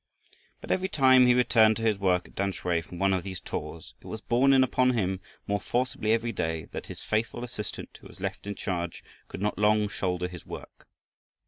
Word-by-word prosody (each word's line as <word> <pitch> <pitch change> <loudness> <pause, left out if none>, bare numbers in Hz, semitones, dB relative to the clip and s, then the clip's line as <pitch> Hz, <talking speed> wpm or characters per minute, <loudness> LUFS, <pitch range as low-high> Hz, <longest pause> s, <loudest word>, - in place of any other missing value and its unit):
But - - -6
every 190 +1 +1
time 130 -5 +6
he 125 - +5
returned 110 -3 +5
to 115 - -4
his 110 -3 +2
work 90 -2 +1
at - - -20
Tamsui 90 -3 -1
from 90 - -10
one 95 +2 +2
of 95 - +1
these 95 -1 -6
tours, - - -6
it - - -13
was 110 - -5
borne 125 +5 +3
in 135 -1 +6
upon 130 0 +2
him 95 -3 0 0.3
more 100 0 0
forcibly 120 -3 -1
every 115 +1 +1
day 80 -5 -2
that - - -6
his - - -9
faithful 115 +2 -1
assistant 110 -3 -7
who - - -12
was - - -16
left 95 +1 -4
in 100 - -3
charge, 85 -4 -4 0.2
could 95 - -6
not 105 -1 -1
long 105 0 +3
shoulder 90 -3 -2
his 90 -1 -10
work. - - -10
105 Hz, 210 wpm, -28 LUFS, 95-120 Hz, 0.3 s, time